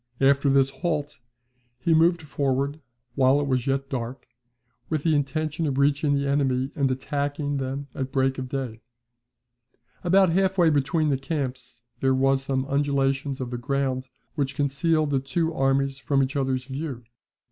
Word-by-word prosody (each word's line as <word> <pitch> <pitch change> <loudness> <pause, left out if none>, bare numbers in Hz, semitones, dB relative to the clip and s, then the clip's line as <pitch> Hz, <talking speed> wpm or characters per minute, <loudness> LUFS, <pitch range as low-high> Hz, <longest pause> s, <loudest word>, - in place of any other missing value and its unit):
After 140 +1 +4
this 135 0 +4
halt, 150 -4 -3 0.6
he 165 +7 +1
moved 165 +1 +4
forward, 140 +1 -1 0.3
while 135 +1 +4
it 145 - 0
was 130 -2 0
yet 135 0 0
dark, 125 -1 -5 0.6
with 155 -2 -1
the 165 - +3
intention 155 +3 -1
of 135 -2 -1
reaching 145 +1 +2
the 140 0 0
enemy, 135 -1 +1
and 140 -2 +1
attacking 145 +2 -2
them 135 +1 -3
at 135 -1 -4
break 135 0 +1
of 130 -1 -5
day. 125 -5 -4 1.2
About 185 0 +4
half 190 +2 +1
way 170 -3 +5
between 150 +2 +1
the 135 -2 +1
camps 130 -4 -4 0.2
there 130 0 +2
were 135 +1 +3
some 135 0 -2
undulations 140 -1 0
of 125 -2 -4
the 120 - -3
ground, 130 0 -1 0.2
which 140 -2 -2
concealed 150 +2 +1
the 135 - +2
two 160 +5 -1
armies 135 0 +1
from 140 -1 +1
each 135 +3 -3
other's 130 -2 0
view. 135 -2 -5
140 Hz, 160 wpm, -25 LUFS, 135-145 Hz, 1.2 s, way